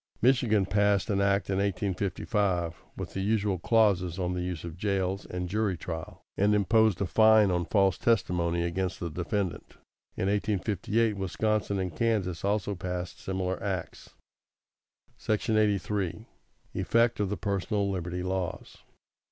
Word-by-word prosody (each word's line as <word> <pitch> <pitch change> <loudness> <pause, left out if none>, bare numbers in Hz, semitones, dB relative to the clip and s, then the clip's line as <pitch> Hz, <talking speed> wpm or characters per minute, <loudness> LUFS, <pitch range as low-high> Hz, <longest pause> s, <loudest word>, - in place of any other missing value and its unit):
Michigan 115 -5 +3
passed 100 0 +2
such 105 - -1
an 100 - +1
act 100 -1 +2
in 95 - 0
1855, 95 -2 -1 0.2
with - - -6
the 95 - -2
usual 100 -2 +1
clauses 95 -5 +2
on 90 -1 -1
the 90 - -2
use 90 -2 -4
of 85 -2 -6
jails 95 0 -1
and 90 0 -4
jury 100 -1 0
trial, 80 -1 -7
and 105 +1 +3
imposed 110 -1 +3
a - - +2
fine 110 +1 +5
on 90 -1 0
false 95 -1 +2
testimony 90 -6 +1
against 90 +2 -2
the 85 -2 -4
defendant. 90 +2 -3 0.4
In - - 0
1858 105 +2 0
Wisconsin 100 +2 -1
and 90 -4 -3
Kansas 95 -5 0
also 100 0 0
passed 90 -1 -5
similar 95 -1 -3
acts. 95 -4 -5 1.0
=§ 110 +1 0
83. 100 -1 0 0.5
Effect 115 0 +2
of 100 -2 0
the 105 - -2
personal 100 0 -1
liberty 90 -1 -3
laws. 95 -1 -4
95 Hz, 145 wpm, -28 LUFS, 90-105 Hz, 1.0 s, fine